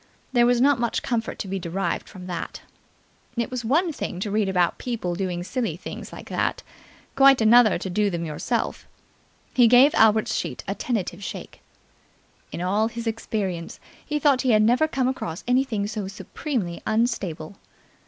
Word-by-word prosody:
There 240 -1 +5
was 245 -1 +3
not 280 +1 +4
much 235 -1 -1
comfort 230 -2 -2
to 200 - -5
be 195 0 -3
derived 175 0 -3
from 180 -1 -10
that. 175 -2 -5 0.8
It 235 +2 -1
was 250 -2 -3
one 320 +8 +1
thing 180 - -5
to 205 - -2
read 210 -1 +1
about 180 -2 +1
people 225 -8 -3
doing 175 -1 -3
silly 215 - -2
things - - -8
like - - -10
that, - - -1 0.5
quite 270 -1 +6
another 225 -1 +6
to 180 - -5
do 205 +3 +1
them 170 -2 -3
yourself. 165 +10 -3 0.7
He 245 -2 +6
gave 250 +5 +6
Albert's 220 -1 +4
sheet - - -3
a - - -1
tentative 200 -5 -3
shake. - - -8 0.9
In - - -5
all 205 +5 +1
his 235 0 -6
experience 205 -6 -3 0.2
he 300 - -2
thought 285 -3 +3
he 255 -3 +2
had 215 0 +5
never 245 +8 +3
come 265 -4 0
across 190 -9 -4
anything 245 -5 +1
so 210 -2 -4
supremely 200 - -4
unstable. 200 -7 -1
220 Hz, 170 wpm, -24 LUFS, 185-245 Hz, 0.9 s, quite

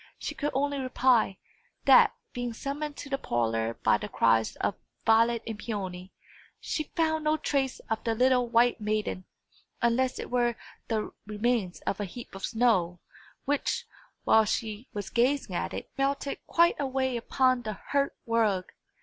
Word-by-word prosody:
She - - -4
could 295 - -2
only 285 +1 0
reply, 255 -6 +2 0.5
that, - - +7 0.2
being 245 -2 -3
summoned 285 +4 -4
to - - -7
the 275 - 0
parlour 115 - -1
by 105 - +4
the 105 - -6
cries 115 -1 +2
of - - -1 0.3
Violet 230 +1 +4
and 225 -2 -5
Peony, 190 -4 -5 0.5
she 310 - -2
found 315 -1 +1
no 305 +1 +2
trace 275 -3 0
of 220 0 -3
the 225 -1 0
little 250 +1 +3
white 235 0 +3
maiden, 210 -3 -2 0.5
unless 250 +2 +1
it - - -6
were 240 -1 +2 0.3
the 220 -2 -1 0.2
remains 215 -3 -1
of 200 - -2
a 205 - -1
heap 235 +6 -10
of 195 0 -9
snow, 215 -7 +2 0.5
which, 290 - 0 0.4
while 220 0 +5
she 220 +2 -3
was 205 -2 -5
gazing 245 -3 +1
at - - -2
it, - - -7
melted 275 +1 0
quite 340 0 +3
away 265 -2 0
upon 255 +1 +2
the 215 -2 -4 0.2
hearth 280 0 +1
rug. 220 -5 +1
235 Hz, 160 wpm, -28 LUFS, 210-265 Hz, 0.5 s, that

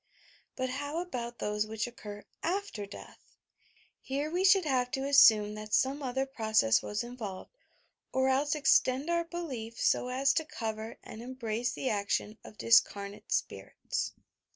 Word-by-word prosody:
But 255 -1 -2
how 285 +4 -4
about 245 -9 -5
those 210 0 -1
which 220 -1 -2
oeeur 210 -4 -9 0.2
after 355 - -2
death 200 - -11
I - - -32 0.6
Here 285 +3 -3
we 360 +2 0
should 380 -2 +6
have 255 -4 +1
to 270 0 -1
assume 220 -7 +6
that 215 0 -2
some 275 +3 +1
other 265 0 -1
process 220 - +2
was 210 +2 -3
involved, 230 -6 -7 0.6
or 260 0 +2
else 280 +3 +2
extend 275 +1 +3
our 340 0 +2
belief 265 -10 -6
so - - +2
as 260 +2 +2
to 320 - +1
cover 220 -6 -5
and 220 - -9
embrace 240 -1 -3
the 265 - -2
action 210 +1 -1
of 215 - -13
discarnate 205 -3 +2
spirits. - - -2
250 Hz, 155 wpm, -31 LUFS, 215-280 Hz, 0.6 s, should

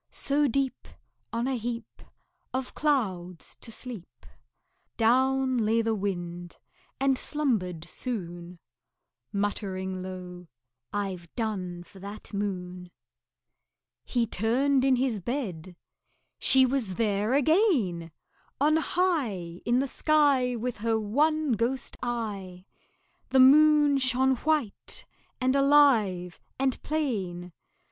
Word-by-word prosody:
So 290 +1 +1
deep, 270 +1 -1 0.4
On 235 +2 -1
a 265 - 0
heap 235 0 -5 0.5
Of 260 -1 -3
clouds, 190 - -1
to 230 - -3
sleep, 215 - -8 0.7
Down 260 +2 +2
lay 225 +1 +2
the 225 0 +1
Wind, 175 -4 -4 0.4
and 270 -1 +2
slumbered 205 - -1
soon 175 -5 -6 0.7
Muttering 190 -2 -2
low, 180 -1 -8 0.4
"I've 190 -5 -4
done 185 -7 -3
for 190 +2 -16
that 200 +3 -9
Moon." 180 -3 -4 1.1
He 240 -2 0
turned 255 +6 +1
in 265 -1 +4
his 250 -4 0
bed; 185 - -4 0.6
she 265 0 +6
was 250 -8 0
there 210 +1 0
again! 280 - +2 0.5
On 305 +3 +4
high 250 - -1
In 240 +1 +2
the 270 +2 +1
sky 280 -4 +2
With 240 +1 -3
her 225 0 +1
one 300 +7 +1
ghost 235 +4 -1
eye, 200 -7 -4 0.6
The 265 - +3
Moon 295 +1 +6
shone 260 +1 +2
white 300 -7 -2 0.3
and 260 +1 +1
alive 245 -11 +3 0.2
and 265 -1 0
plain. 195 - -2
230 Hz, 105 wpm, -27 LUFS, 185-270 Hz, 1.1 s, she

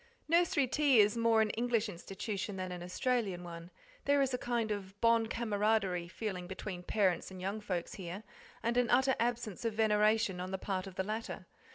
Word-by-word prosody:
Nursery 330 -4 +3
tea 275 -1 +4
is 210 +1 +5
more 230 -1 +4
an 215 -1 +2
English 235 -1 0
institution 195 +2 -5
than 185 -1 -4
an 180 -1 -6
Australian 190 0 -1
one; 170 0 -8 0.4
there 285 0 +4
is 270 -1 +2
a - - +1
kind 235 -3 -1
of 200 -1 -5
bon 230 -1 +4
camaraderie 210 -6 0
feeling 185 -1 -4
between 190 -1 -6
parents 190 -1 +1
and 190 -1 -9
young 195 +4 -3
folks 180 -4 -3
here, 185 +2 -6 0.4
and 235 +1 +1
an 245 -1 +3
utter 265 +1 +4
absence 235 -4 -1
of 225 -2 -1
veneration 210 -3 +3
on 180 +1 -4
the 190 - -2
part 190 0 -3
of 190 - -10
the 190 - 0
latter. 215 +3 -4
210 Hz, 190 wpm, -33 LUFS, 185-230 Hz, 0.4 s, is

